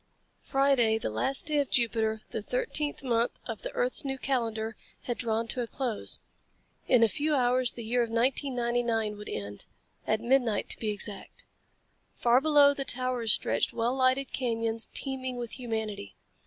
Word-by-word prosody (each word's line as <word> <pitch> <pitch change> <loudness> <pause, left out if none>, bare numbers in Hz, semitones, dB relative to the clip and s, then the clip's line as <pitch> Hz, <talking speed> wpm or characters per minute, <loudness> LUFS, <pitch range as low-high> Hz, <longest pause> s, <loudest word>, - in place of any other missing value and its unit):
Friday, 270 -5 +3
the 210 - -3
last 265 - 0
day 300 -1 +1
of 280 - 0
Jupiter, 220 -2 +1
the 220 - -3
thirteenth 305 - -1
month 235 -2 0
of - - -5
the - - -4
earth's - - +1
new 270 -1 -2
calendar, 225 -5 -1 0.3
had 240 - -2
drawn 225 0 -1
to 250 - -1
a 235 - -3
close. 245 -4 -1 0.7
In 245 -3 +5
a - - +7
few 295 +9 0
hours 250 -1 +2
the 235 - -7
year 240 +2 +1
of 235 - 0
1999 235 -3 0
would 210 0 -8
end 100 0 -5 0.4
at 215 0 +2
midnight, 235 -2 +1
to - - -1
be 220 - -1
exact. 205 -1 -6 0.7
Far 240 +2 +4
below 290 -2 +6
the 280 - -3
towers 250 -3 0
stretched - - +1
well 235 +1 0
lighted 260 0 +2
canyons 230 -3 -1
teeming 260 -2 -3
with 240 -2 -5
humanity. 220 - -4
240 Hz, 165 wpm, -29 LUFS, 225-265 Hz, 0.7 s, a